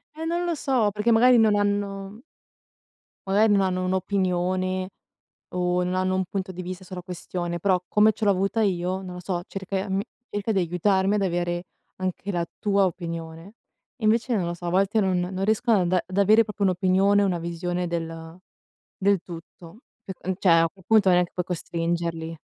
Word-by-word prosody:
Eh, 320 +1 -5
non 345 +1 -1
lo 345 - 0
so, 255 -8 +1
perché 210 +3 0
magari 240 +1 +6
non 215 -2 +4
hanno 205 +1 -2 1.1
magari 210 +2 +4
non 200 - +4
hanno 185 -1 0
un'opinione, 185 0 0 0.7
o 180 0 +1
non 180 +1 -1
hanno 185 0 +1
un 190 0 +1
punto 190 +1 -4
di 180 +1 -6
vista 185 +1 -7
sulla 180 -1 -8
questione; 175 -1 -4
però 185 0 +2
come 215 +1 +4
ce 220 - -4
l'ho 200 - +4
avuta 195 +4 +1
io, 185 -1 -1
non 180 -1 -7
lo 180 - -7
so, 175 -1 -3
cerca 195 0 -5
e 195 +2 -4
mi 195 +2 0 0.3
cerca 205 +2 -2
di 195 - +2
aiutarmi 190 +3 +1
ad 200 - 0
avere 175 -1 -1 0.3
anche 185 +1 -3
la 170 -2 -1
tua 200 -1 +3
opinione. 170 +2 -6 0.5
Invece 230 +3 +2
non 185 - 0
lo 175 - -3
so, 175 0 -8
a - - -1
volte 195 +4 +2
non 190 -2 +1
non 185 +2 -2
riescono 220 +1 +2
ad 185 - +2
anda 180 0 +1
ad 185 - -7
avere 215 +3 +5
proprio 210 -1 -6
un'opinione, 190 +2 +3
una 180 -3 0
visione 175 +1 -3
del 165 0 -5 0.6
del 200 -1 +2
tutto. 170 +3 -11 0.3
E 190 - -5
uhm, 190 - 0
cioè 190 - +2
a 165 0 +3
quel 190 -2 -21
punto 215 -4 +4
non 180 0 +5
è - - +3
che 175 - -8
puoi 180 -1 -2
costringerli. 165 -1 -3
185 Hz, 195 wpm, -25 LUFS, 175-205 Hz, 1.1 s, magari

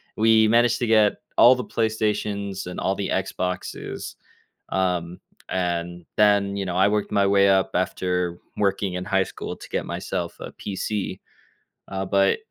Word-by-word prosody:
We 110 0 +5
managed 120 +1 +4
to 120 - 0
get 110 -2 +5 0.2
all 125 +2 +8
the 125 - -4
PlayStations 105 -3 -1
and 90 - -6
all 95 - +1
the 100 -1 -3
Xboxes. 90 -1 -3 0.5
Um, 90 -2 -1 0.3
and 85 -1 -2
then, 100 -1 +4
you 100 - -2
know, 90 -1 -3
I 95 +2 +5
worked 105 0 0
my 100 -1 +3
way 100 0 +4
up 95 -1 +3
after 90 -1 -1 0.2
working 100 -1 0
in 90 0 -4
high 95 -1 +2
school - - -7
to - - -12
get - - -2
myself - - -4
a - - -7
PC. 100 -1 -4 0.7
Uh, 95 0 -3
but 95 - +2
100 Hz, 160 wpm, -24 LUFS, 90-105 Hz, 0.7 s, all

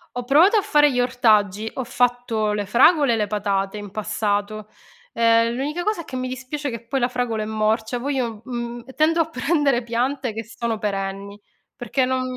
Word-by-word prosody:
Ho 245 - -3
provato 325 - +5
a 415 - +3
fare 295 -4 +4
gli 250 - -1
ortaggi, 220 -4 +2
ho 260 - -2
fatto 245 -3 0
le 205 -1 -2
fragole 275 - +4
e - - +2
le 210 -2 0
patate 200 -1 -1
in 205 -2 -8
passato, 215 0 -2 0.4
ehm, 230 0 +3
l'unica 300 +7 -3
cosa, 420 -5 -1
che 260 - -8
mi 255 0 -2
dispiace 265 +3 -5
che 230 0 -7
poi 270 +1 -1
la 245 - +2
fragola 245 -3 -2
è - - -4
morcia, 220 +2 -1
poi 280 +3 -2
io 230 -5 -3
mhmm, 240 -1 -5
tendo 325 +2 +3
a 325 - -2
prendere 275 -3 +1
piante 245 +1 -2
che 225 +1 -5
sono 230 0 -3
perenni, 200 -1 -4 0.4
perché 255 +2 -1
non 260 0 -1
240 Hz, 190 wpm, -22 LUFS, 215-265 Hz, 0.4 s, provato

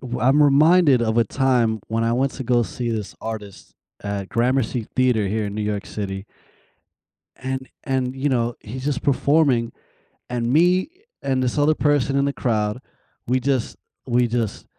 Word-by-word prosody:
w 125 -2 -5
I'm 135 +4 +4
reminded 145 -2 +5
of 110 0 0
a 115 - +4
time 120 -3 +1
when 115 +1 0
I 115 - +1
went 135 +3 +1
to 130 - -6
go 120 0 +3
see 120 +1 -4
this 110 -3 -4
artist 105 -4 -8 0.3
at 100 -1 -4
Gramercy 120 -1 0
Theater 125 -5 +2
here 105 0 -1
in 100 - -5
New 105 - -2
York 105 -1 -3
City 95 -1 -5 1.1
and 130 0 -5 0.2
and, 130 -2 -1
you 135 +2 -1
know, 120 -2 0
he's 130 +5 -8
just 145 -1 -1
performing, 140 -4 +2 0.6
and 120 0 -1
me 180 - +3 0.3
and 130 -1 0
this 125 +1 -1
other 145 +2 +4
person 145 -3 +1
in 140 - +2
the 140 - -1
crowd, 110 -1 -1 0.5
we 130 +1 +2
just 130 -2 -1 0.3
we 120 0 +2
just 115 -3 -2
125 Hz, 170 wpm, -22 LUFS, 110-135 Hz, 1.1 s, reminded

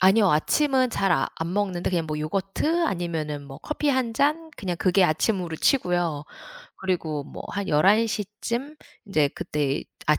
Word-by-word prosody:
아니요. 195 +1 +5
아침은 260 - +2
잘 195 -3 0
아 135 - +2
안 165 +2 -2
먹는데 190 -4 0
그냥 170 -3 0
뭐 155 0 -3
요거트 195 - 0
아니면은 160 - -3
뭐 135 -1 -10
커피 300 -1 -2
1 260 -4 +1
잔, 305 +5 +1
그냥 180 -3 -3
그게 185 +2 +3
아침으로 170 0 0
치고요. 175 - +1 0.5
그리고 160 -6 -2
뭐 - - -9
한 200 -1 -3
11:00 210 +7 +3 0.2
쯤 270 +6 -3 0.3
인제 155 -7 +2
그때 145 -1 -1 0.2
앗 150 0 +4
185 Hz, 285 characters per minute, -25 LUFS, 155-230 Hz, 0.5 s, 아니요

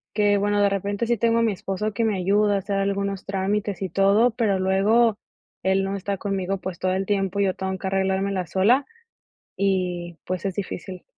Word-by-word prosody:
qué 205 -1 +3
bueno, 205 0 +1
de - - +5
repente 200 +3 -2
sí 235 - +2
tengo 230 +1 +2
a - - +3
mi 225 - +2
esposo 195 +3 -3
que 230 - -1
me 215 -3 +1
ayuda 205 +2 +2
a - - +2
hacer 195 +1 -3
algunos 200 0 -1
trámites 195 0 -2
y 185 - -2
todo, 200 +7 +4
pero 220 -4 +1
luego 205 +4 +3 0.4
él 190 +1 +2
no 195 +1 -2
está 200 0 -3
conmigo, 195 -1 -2
pues, 185 -2 -6
todo 185 0 0
el 190 +1 -1
tiempo, 195 -1 -1
yo 195 -2 +2
tengo 190 0 -3
que 190 - -8
arreglármela 190 -1 0
sola 225 - +3 0.8
y 180 -3 -1
pues 185 +2 -3
es 190 - -2
difícil. 185 -1 -6
195 Hz, 200 wpm, -24 LUFS, 190-205 Hz, 0.8 s, de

